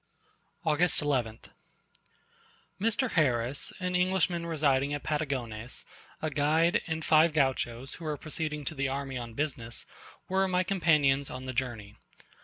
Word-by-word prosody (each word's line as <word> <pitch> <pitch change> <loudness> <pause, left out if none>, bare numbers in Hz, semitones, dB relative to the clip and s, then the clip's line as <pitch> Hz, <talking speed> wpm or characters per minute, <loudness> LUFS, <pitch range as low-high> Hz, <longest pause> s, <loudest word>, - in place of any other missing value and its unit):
August 160 +3 +3
11th. 125 -7 -1 1.3
Mr. 230 +3 +1
Harris, 130 -4 +1
an 180 -1 -1
Englishman 180 -2 +1
residing 145 -3 +2
at 145 - -6
Patagones, 125 -7 -2 0.4
a 155 - 0
guide, 155 +4 +3
and 160 -1 -3
five 155 +1 +5
Gauchos 130 -3 0
who 170 - -8
were 150 -1 -2
proceeding 150 -1 -3
to - - -2
the 140 -2 -1
army 135 -1 -3
on 115 -2 -7
business, 130 -6 -3 0.4
were 190 +1 +2
my 185 0 +2
companions 150 -7 +3
on 130 0 -6
the 130 - -4
journey. 115 -5 -3
145 Hz, 135 wpm, -30 LUFS, 130-165 Hz, 1.3 s, five